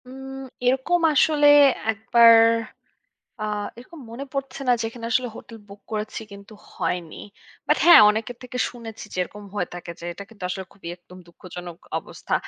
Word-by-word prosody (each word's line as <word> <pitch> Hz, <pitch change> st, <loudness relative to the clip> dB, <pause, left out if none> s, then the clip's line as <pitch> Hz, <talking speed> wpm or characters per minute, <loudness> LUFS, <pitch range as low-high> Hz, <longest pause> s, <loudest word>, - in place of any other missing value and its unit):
উম 270 Hz, +1 st, -9 dB, 0.2 s
এরকম 265 Hz, +8 st, +2 dB
আসলে 295 Hz, +1 st, +4 dB, 0.4 s
একবার 230 Hz, +1 st, +6 dB, 1.1 s
আ -, -, -2 dB, 0.3 s
এরকম 295 Hz, +6 st, -12 dB
মনে 245 Hz, +4 st, -6 dB
পড়ছে 275 Hz, 0 st, -5 dB
না -, -, +6 dB
যেখানে 230 Hz, +1 st, -6 dB
আসলে 250 Hz, -1 st, +1 dB
হোটেল 230 Hz, -, -11 dB
বুক 200 Hz, 0 st, -13 dB
করেছি, 215 Hz, 0 st, -4 dB
কিন্তু 200 Hz, +2 st, -13 dB, 0.2 s
হয়নি। 170 Hz, -3 st, -3 dB, 0.5 s
বাট -, -, +3 dB
হ্যাঁ, 345 Hz, -, +10 dB
অনেকের 220 Hz, +3 st, -4 dB
থেকে 250 Hz, 0 st, -7 dB
শুনেছি 230 Hz, -3 st, -10 dB
যে -, -, -8 dB
এরকম 210 Hz, +3 st, -9 dB
হয়ে 200 Hz, -4 st, -2 dB
থাকে, 175 Hz, -1 st, -8 dB
যে -, -, -9 dB
এটা 200 Hz, +4 st, -10 dB
কিন্তু 215 Hz, -4 st, -17 dB
আসলে 190 Hz, +1 st, -4 dB
খুবই 190 Hz, -4 st, -11 dB
একদম 180 Hz, +1 st, -16 dB
দুঃখজনক 175 Hz, 0 st, -10 dB, 0.2 s
অবস্থা। -, -, -5 dB
225 Hz, 160 wpm, -23 LUFS, 200-255 Hz, 1.1 s, হ্যাঁ